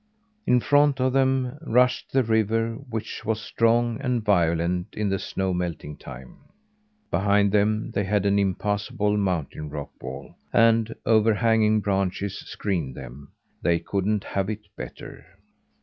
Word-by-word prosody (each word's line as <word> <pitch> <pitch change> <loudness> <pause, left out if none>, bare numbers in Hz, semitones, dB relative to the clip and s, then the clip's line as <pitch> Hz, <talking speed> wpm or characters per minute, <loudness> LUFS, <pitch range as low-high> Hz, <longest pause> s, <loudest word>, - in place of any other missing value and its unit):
In 125 - +5
front 145 +1 +3
of 130 0 +1
them 130 0 +1
rushed 125 +2 +2
the 135 -1 +3
river, 115 0 +1 0.2
which 110 -2 -5
was 110 0 -1
strong 115 +2 +1
and 125 -5 -1
violent 85 -2 +2
in 105 -1 -1
the 95 0 0
snow 95 0 -2
melting 85 -4 -4
time; 65 -2 -11 0.7
behind 100 +2 +3
them 105 +1 +1
they 100 - 0
had 100 0 0
an 100 0 +3
impassable 105 +1 0
mountain 85 -6 -2
rock 75 -1 -6
wall, 65 +1 -8 0.2
and 115 -1 +3
overhanging 110 -1 +3
branches 95 0 -1
screened 85 -11 -3
them. 65 +2 -10 0.3
They 85 -1 +2
couldn't 100 +4 -1
have 95 0 -2
it 105 -1 -5
better. - - -9
105 Hz, 135 wpm, -25 LUFS, 90-115 Hz, 0.7 s, In